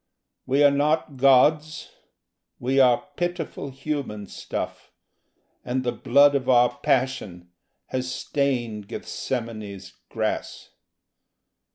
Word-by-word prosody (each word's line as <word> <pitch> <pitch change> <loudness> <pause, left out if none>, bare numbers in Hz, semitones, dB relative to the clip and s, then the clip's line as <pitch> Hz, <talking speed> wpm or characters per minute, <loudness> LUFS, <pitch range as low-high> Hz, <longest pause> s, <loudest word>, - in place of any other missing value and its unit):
We 135 +3 +3
are 145 - +7
not 145 0 0
gods: 150 +4 +3 0.7
we 130 +2 0
are 125 -2 +4
pitiful 175 -5 -3
human 135 -6 -4
stuff; - - -6 0.7
And 130 +1 -2
the 120 - 0
blood 140 +4 +4
of 130 -2 -1
our 125 -1 +4
passion 130 -11 -1 0.3
has 130 0 -3
stained 120 -7 -2
Gethsemane's 110 -7 -5 0.2
grass. - - -3
130 Hz, 95 wpm, -24 LUFS, 120-140 Hz, 0.7 s, are